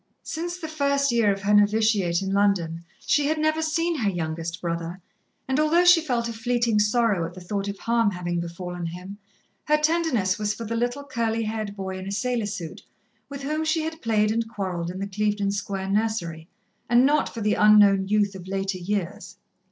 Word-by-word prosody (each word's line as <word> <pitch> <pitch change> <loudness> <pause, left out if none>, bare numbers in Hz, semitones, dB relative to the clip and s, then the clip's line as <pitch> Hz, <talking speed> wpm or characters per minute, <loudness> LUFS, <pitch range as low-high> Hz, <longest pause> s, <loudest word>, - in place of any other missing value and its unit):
Since 345 +2 -4
the 330 -3 -6
first 280 -3 +1
year 230 -3 +3
of 195 0 -4
her 205 +1 +2
novitiate 205 -4 +3
in 195 0 -2
London 180 -5 +1 0.2
she 290 -1 +2
had 310 +1 0
never 310 +1 +1
seen 330 +1 0
her 215 -4 +1
youngest 165 -1 -4
brother, 170 +1 -4 0.5
and 265 +2 0
although 325 +4 +3
she 350 -1 +7
felt 245 -6 -1
a 230 - -4
fleeting 235 -1 +1
sorrow 210 -3 +2
at 170 +2 -6
the - - -8
thought 195 +2 -3
of 200 0 -4
harm 230 -1 +1
having 175 -2 -3
befallen 175 0 -5
him, 180 +4 -8 0.5
her 300 0 +3
tenderness 300 - +1
was 210 0 -1
for 230 - -6
the 230 +2 -3
little, 245 +4 -1
curly 230 -4 -1
haired 215 -2 -4
boy 190 -1 -5
in 185 - -7
a - - -4
sailor 235 +1 -1
suit 190 -6 -6 0.5
with 280 -1 -7
whom 305 +3 -1
she 315 0 0
had 320 0 -5
played 215 -2 +2
and 225 0 -1
quarrelled 185 -6 -3
in 180 - -6
the 195 - -3
Clevedon 205 0 -1
Square 195 -1 -3
nursery, 200 -7 -1 0.4
and 240 +2 +5
not 295 +1 +2
for 230 - -6
the 210 0 +2
unknown 205 -2 +5
youth 205 -1 +2
of 185 -1 -10
later 195 0 -2
years. 195 0 -4
210 Hz, 200 wpm, -25 LUFS, 190-245 Hz, 0.5 s, she